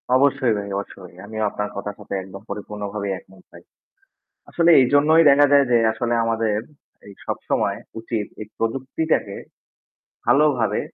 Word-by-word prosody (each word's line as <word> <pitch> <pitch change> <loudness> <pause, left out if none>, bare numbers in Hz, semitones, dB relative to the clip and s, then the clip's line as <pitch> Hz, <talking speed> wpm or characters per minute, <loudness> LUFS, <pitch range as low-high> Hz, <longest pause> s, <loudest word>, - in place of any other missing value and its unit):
অবশ্যই 135 -3 +3
ভাই, 100 - -5
অবশ্যই। 95 -3 -8
আমিও 110 +1 -4
আপনার 105 0 -4
কথার 100 0 -5
সাথে 105 - -8
একদম 95 +1 -11
পরিপূর্ণভাবে 105 0 -5
একমত 95 0 -11
ভাই। - - -15 0.9
আসলে 170 0 +2
এইজন্যই 145 +5 +4
দেখা 145 +1 +6
যায় 140 -1 +6
যে 120 - +5 0.2
আসলে 120 +2 -2
আমাদের, 110 -2 0 0.5
এই 100 - -11
সবসময় - - -1 0.2
উচিত 115 -2 -3 0.2
এই 105 - -7
প্রযুক্তিটাকে 130 -1 -1 0.9
ভালোভাবে 130 -2 +2
115 Hz, 130 wpm, -22 LUFS, 100-135 Hz, 0.9 s, দেখা